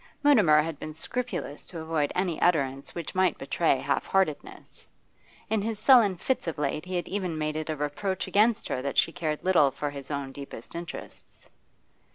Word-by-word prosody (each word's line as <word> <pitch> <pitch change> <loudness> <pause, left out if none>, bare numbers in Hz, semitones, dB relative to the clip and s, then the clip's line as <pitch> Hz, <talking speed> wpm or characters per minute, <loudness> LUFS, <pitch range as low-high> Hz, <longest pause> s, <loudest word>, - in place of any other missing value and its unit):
Mutimer 200 - +6
had 160 -2 -5
been 155 0 -7
scrupulous 240 - -4
to 170 - -7
avoid 160 -2 -1
any 180 -3 -1
utterance 140 -5 +1
which 170 -3 -5
might 185 -2 +2
betray 140 +1 +1
half 135 +2 -1
heartedness; 190 -6 -2 0.6
in 220 -1 0
his 220 +1 -2
sullen 215 -4 +6
fits 250 +4 -2
of 165 - -3
late 150 +2 -2
he 185 0 -4
had 175 - -2
even 185 -5 -2
made 155 0 -2
it 155 0 -4
a 155 - -1
reproach 150 +6 -2
against 220 +2 +3
her 130 - -2
that 140 +1 -3
she - - +4
cared 155 -3 -3
little 175 -7 +5
for 145 +2 -4
his 140 -1 -8
own 140 -2 -3
deepest 135 -4 -9
interests. 170 0 -9
160 Hz, 185 wpm, -27 LUFS, 145-190 Hz, 0.6 s, Mutimer